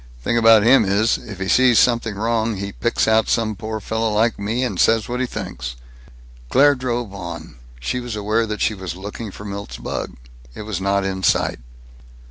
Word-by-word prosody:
Thing 120 Hz, -, 0 dB
about 115 Hz, -2 st, +6 dB
him 125 Hz, +1 st, +6 dB
is: 105 Hz, +3 st, +1 dB
if 105 Hz, -5 st, -10 dB
he 95 Hz, -, -3 dB
sees 125 Hz, +1 st, +4 dB
something 115 Hz, -3 st, +2 dB
wrong, 110 Hz, +1 st, 0 dB
he 100 Hz, +1 st, -4 dB
picks 120 Hz, +3 st, 0 dB
out 110 Hz, -1 st, +3 dB
some 110 Hz, -2 st, +1 dB
poor 110 Hz, +1 st, -5 dB
fellow 110 Hz, +1 st, -1 dB
like 110 Hz, +1 st, +1 dB
me, 110 Hz, +5 st, -1 dB
and 125 Hz, -, -3 dB
says 115 Hz, -1 st, +3 dB
what 125 Hz, +1 st, -3 dB
he 130 Hz, -, 0 dB
thinks." 95 Hz, -, -6 dB, 0.7 s
Claire 145 Hz, +2 st, +5 dB
drove 120 Hz, -5 st, -3 dB
on. 85 Hz, -8 st, -8 dB, 0.2 s
She 65 Hz, -, -2 dB
was 120 Hz, -3 st, -5 dB
aware 110 Hz, +2 st, 0 dB
that 105 Hz, 0 st, -4 dB
she 110 Hz, -, +2 dB
was 95 Hz, -4 st, -6 dB
looking 105 Hz, +4 st, -7 dB
for 105 Hz, +2 st, -10 dB
Milt's 100 Hz, 0 st, -6 dB
bug. -, -, -5 dB, 0.4 s
It -, -, -7 dB
was 105 Hz, -3 st, -4 dB
not 100 Hz, 0 st, +1 dB
in 95 Hz, -1 st, -3 dB
sight. -, -, +1 dB
110 Hz, 195 wpm, -20 LUFS, 100-115 Hz, 0.7 s, about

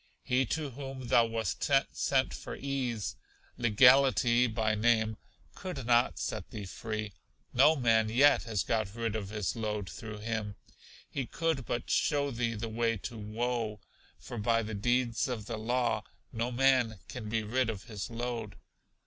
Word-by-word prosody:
He 125 Hz, 0 st, +1 dB
to 150 Hz, 0 st, -2 dB
whom 135 Hz, -1 st, -7 dB
thou 115 Hz, -1 st, +5 dB
wast 115 Hz, 0 st, -2 dB, 0.3 s
sent 135 Hz, -1 st, +1 dB
for -, -, -6 dB
ease, 130 Hz, -6 st, -3 dB, 0.4 s
Legality 125 Hz, +1 st, +5 dB
by 110 Hz, -1 st, 0 dB
name, 110 Hz, 0 st, +2 dB, 0.4 s
could 180 Hz, -, -6 dB
not 120 Hz, 0 st, +3 dB
set -, -, -4 dB
thee 105 Hz, -2 st, -6 dB
free; 110 Hz, +1 st, -5 dB, 0.4 s
no 145 Hz, +6 st, +6 dB
man 115 Hz, -5 st, +3 dB
yet 140 Hz, +6 st, +5 dB
has 110 Hz, -5 st, -1 dB
got 110 Hz, -2 st, -1 dB
rid 115 Hz, -2 st, -2 dB
of 100 Hz, -3 st, -3 dB
his 105 Hz, -3 st, -2 dB
load 105 Hz, -3 st, -3 dB
through 105 Hz, +3 st, -7 dB
him; 105 Hz, -1 st, -3 dB, 0.5 s
he 135 Hz, -4 st, -4 dB
could 160 Hz, -6 st, -1 dB
but 120 Hz, -, -2 dB
show 140 Hz, -1 st, +2 dB
thee 115 Hz, -1 st, -1 dB
the 110 Hz, +2 st, -4 dB
way 115 Hz, 0 st, 0 dB
to 120 Hz, +5 st, -7 dB
woe, 110 Hz, 0 st, -2 dB, 0.4 s
for 120 Hz, -, -7 dB
by 115 Hz, +2 st, +2 dB
the 110 Hz, +1 st, -5 dB
deeds 120 Hz, +3 st, +1 dB
of 120 Hz, -5 st, -4 dB
the 115 Hz, 0 st, -4 dB
law 120 Hz, +3 st, 0 dB, 0.3 s
no 115 Hz, +2 st, -1 dB
man 125 Hz, -3 st, +3 dB
can 110 Hz, -4 st, -6 dB
be 110 Hz, 0 st, 0 dB
rid 120 Hz, +3 st, 0 dB
of 105 Hz, -4 st, -4 dB
his 105 Hz, -1 st, -6 dB
load. 115 Hz, -2 st, -4 dB
115 Hz, 160 wpm, -31 LUFS, 110-125 Hz, 0.5 s, no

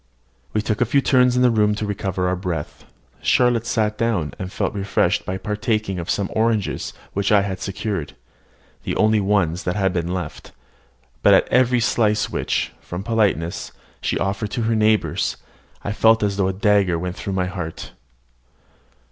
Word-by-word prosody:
We 105 Hz, -, 0 dB
took 110 Hz, 0 st, -1 dB
a -, -, +5 dB
few 130 Hz, +5 st, +2 dB
turns 125 Hz, -2 st, +3 dB
in 125 Hz, -, +3 dB
the 125 Hz, -, +5 dB
room 105 Hz, -2 st, +2 dB
to 105 Hz, -, -3 dB
recover 95 Hz, -2 st, -2 dB
our 90 Hz, -, +1 dB
breath. 90 Hz, -5 st, -5 dB, 0.4 s
Charlotte 120 Hz, -2 st, +2 dB
sat 110 Hz, -2 st, 0 dB
down, 100 Hz, -, 0 dB
and 95 Hz, 0 st, -5 dB
felt -, -, -2 dB
refreshed 100 Hz, -1 st, 0 dB
by 95 Hz, -, -2 dB
partaking 105 Hz, -1 st, -2 dB
of 85 Hz, -, -6 dB
some 100 Hz, -2 st, 0 dB
oranges 110 Hz, -2 st, 0 dB, 0.2 s
which 100 Hz, +1 st, 0 dB
I 105 Hz, -1 st, +6 dB
had 100 Hz, -, -2 dB
had 95 Hz, 0 st, -5 dB
secured, 95 Hz, -5 st, -4 dB, 0.7 s
the -, -, -3 dB
only 110 Hz, 0 st, +3 dB
ones 95 Hz, -4 st, +1 dB
that 90 Hz, -, -2 dB
had 95 Hz, -3 st, +1 dB
been 85 Hz, -1 st, -2 dB
left; 90 Hz, -1 st, -6 dB, 0.7 s
but -, -, +6 dB
at -, -, +3 dB
every 125 Hz, -1 st, +3 dB
slice 110 Hz, -2 st, +1 dB
which, -, -, -1 dB
from 90 Hz, +2 st, -6 dB
politeness, 100 Hz, -8 st, 0 dB, 0.3 s
she -, -, 0 dB
offered 100 Hz, +2 st, -2 dB
to 120 Hz, -, -1 dB
her 115 Hz, 0 st, +1 dB
neighbours, 110 Hz, 0 st, +1 dB, 0.5 s
I 100 Hz, -, -2 dB
felt 110 Hz, +1 st, +4 dB
as 100 Hz, -1 st, 0 dB
though 100 Hz, -1 st, +1 dB
a -, -, +1 dB
dagger 100 Hz, -3 st, +2 dB
went 90 Hz, +1 st, -4 dB
through 100 Hz, -, -4 dB
my 95 Hz, -1 st, 0 dB
heart. 90 Hz, -3 st, -6 dB
105 Hz, 180 wpm, -21 LUFS, 95-110 Hz, 0.7 s, I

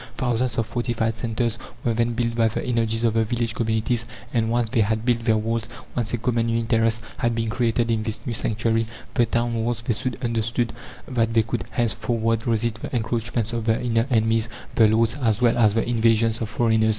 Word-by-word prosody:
Thousands 125 Hz, -1 st, 0 dB
of 115 Hz, -, +1 dB
fortified 115 Hz, 0 st, -1 dB
centres 115 Hz, 0 st, -2 dB, 0.2 s
were 120 Hz, -, +1 dB
then 115 Hz, +1 st, +1 dB
built 115 Hz, 0 st, -1 dB
by 115 Hz, -1 st, +3 dB
the 110 Hz, -, -3 dB
energies 115 Hz, -2 st, 0 dB
of 115 Hz, -2 st, +3 dB
the 115 Hz, 0 st, +3 dB
village 115 Hz, 0 st, -1 dB
communities; 115 Hz, +1 st, 0 dB, 0.3 s
and, 115 Hz, -2 st, +1 dB
once 120 Hz, 0 st, +1 dB
they 120 Hz, -, +3 dB
had 110 Hz, +2 st, 0 dB
built 120 Hz, -2 st, +1 dB
their 110 Hz, -2 st, +4 dB
walls, 115 Hz, +1 st, -2 dB, 0.3 s
once 115 Hz, -3 st, -1 dB
a 120 Hz, -, 0 dB
common 115 Hz, 0 st, 0 dB
interest 115 Hz, 0 st, +1 dB
had 120 Hz, -1 st, 0 dB
been 115 Hz, -1 st, -1 dB
created 115 Hz, 0 st, +1 dB
in 110 Hz, -1 st, +1 dB
this 110 Hz, 0 st, -2 dB
new 120 Hz, -, -2 dB
sanctuary 115 Hz, +1 st, 0 dB, 0.3 s
the 120 Hz, -, +3 dB
town 120 Hz, 0 st, 0 dB
walls 115 Hz, 0 st, -1 dB
they 115 Hz, -, +1 dB
soon 125 Hz, +2 st, -2 dB
understood 115 Hz, 0 st, 0 dB, 0.3 s
that 115 Hz, -3 st, 0 dB
they 115 Hz, -, +5 dB
could 115 Hz, -, -3 dB
henceforward 115 Hz, 0 st, 0 dB
resist 115 Hz, -1 st, 0 dB
the -, -, -5 dB
encroachments 115 Hz, 0 st, -1 dB
of 115 Hz, -2 st, -2 dB
the 110 Hz, 0 st, +2 dB
inner 115 Hz, 0 st, +1 dB
enemies, 110 Hz, -1 st, +2 dB, 0.2 s
the 110 Hz, -, +5 dB
lords, 115 Hz, +2 st, +2 dB
as 110 Hz, -3 st, +2 dB
well 120 Hz, -2 st, +3 dB
as 110 Hz, -3 st, +4 dB
the 115 Hz, -, +1 dB
invasions 115 Hz, -1 st, +2 dB
of 110 Hz, -, -2 dB
foreigners. 110 Hz, -1 st, +2 dB
115 Hz, 205 wpm, -23 LUFS, 110-120 Hz, 0.3 s, they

